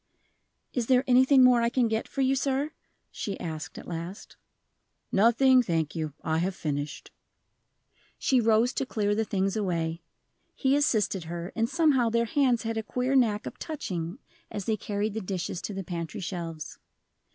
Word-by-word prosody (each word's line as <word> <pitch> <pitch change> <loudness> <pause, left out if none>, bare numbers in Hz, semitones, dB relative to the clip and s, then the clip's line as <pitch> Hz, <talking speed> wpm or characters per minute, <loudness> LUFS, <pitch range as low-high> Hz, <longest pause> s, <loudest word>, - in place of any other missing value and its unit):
"Is 240 -3 -1
there 255 -1 +4
anything 260 +1 +6
more 250 -1 +6
I 235 - +2
can 245 -1 +2
get 220 0 -1
for 275 - -3
you, 265 0 +3
sir?" 275 +2 0 0.4
she 200 - -5
asked, 160 -2 -6
at - - -9
last. 175 +4 -7 0.8
"Nothing, 245 +5 +5
thank 165 -8 -1
you; 155 -3 -3
I 160 0 0
have 180 +2 -1
finished." 145 -3 -4 1.1
She 260 -2 +2
rose 225 +2 +3
to 270 - -1
clear 205 -3 0
the 220 +1 0
things 195 0 0
away. 170 -5 -1 0.5
He 270 0 +2
assisted 215 - +1
her, 170 +2 -5
and 230 0 +1
somehow 290 -8 +3
their 235 +1 +1
hands 250 -2 +2
had 225 0 -2
a - - 0
queer 250 +4 -1
knack 220 -5 +2
of - - -7
touching 185 - -4 0.3
as 205 - -5
they 220 - +1
carried 210 0 -2
the 220 - -3
dishes 185 -2 -3
to 210 - -5
the 195 - -4
pantry 170 +3 -5
shelves. 170 -5 -5
215 Hz, 170 wpm, -28 LUFS, 175-250 Hz, 1.1 s, anything